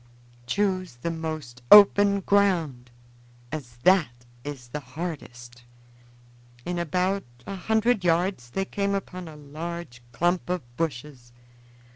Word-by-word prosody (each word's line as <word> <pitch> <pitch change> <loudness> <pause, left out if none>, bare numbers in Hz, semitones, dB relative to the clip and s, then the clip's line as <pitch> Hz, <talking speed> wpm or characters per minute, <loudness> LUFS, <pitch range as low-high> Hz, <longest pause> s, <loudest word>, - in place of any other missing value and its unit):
Choose 185 - 0
the 165 +8 -3
most 155 -7 -5
open 200 -1 +8
ground, 170 -12 +1 0.6
as 130 -6 -7
that 145 -11 +3 0.2
is 135 -4 -7
the 150 - -4
hardest." 130 -5 -7 1.0
In 175 0 -2
about 180 +4 0 0.2
a 195 - -5
hundred 220 +2 +1
yards 170 -6 +1
they 195 +10 -2
came 200 0 -1
upon 185 -2 -5
a 155 - -10
large 150 -2 -7
clump 175 +9 0
of 180 -4 -1
bushes. 135 -5 -4
165 Hz, 115 wpm, -26 LUFS, 130-190 Hz, 1.0 s, open